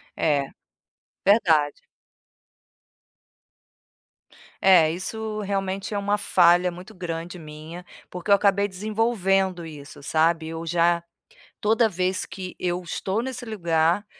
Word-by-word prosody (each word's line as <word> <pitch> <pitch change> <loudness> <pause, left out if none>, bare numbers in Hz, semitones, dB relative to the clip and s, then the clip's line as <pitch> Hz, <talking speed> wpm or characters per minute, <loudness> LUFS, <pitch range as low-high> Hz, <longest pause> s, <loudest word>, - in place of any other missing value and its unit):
É. 145 -3 +1 0.8
Verdade. 160 -8 +3 2.8
É, 175 -5 +6
isso 215 +5 -4
realmente 195 -1 -3
é - - -1
uma 205 +1 0
falha 175 -1 +4
muito 180 +5 -11
grande 175 -1 -5
minha, 155 +3 -9 0.3
porque 180 +2 -7
eu 200 - +8
acabei 200 0 +2
desenvolvendo 195 -3 0
isso, 145 -2 -11
sabe, 160 +2 +1
eu 165 0 -5
já 170 0 +2 0.6
toda 225 +2 +3
vez 185 0 -1
que 185 -2 -8
eu 180 0 -2
estou 190 +4 -2
nesse 260 0 -5
lugar, 170 -3 +1
180 Hz, 110 wpm, -24 LUFS, 165-200 Hz, 2.8 s, eu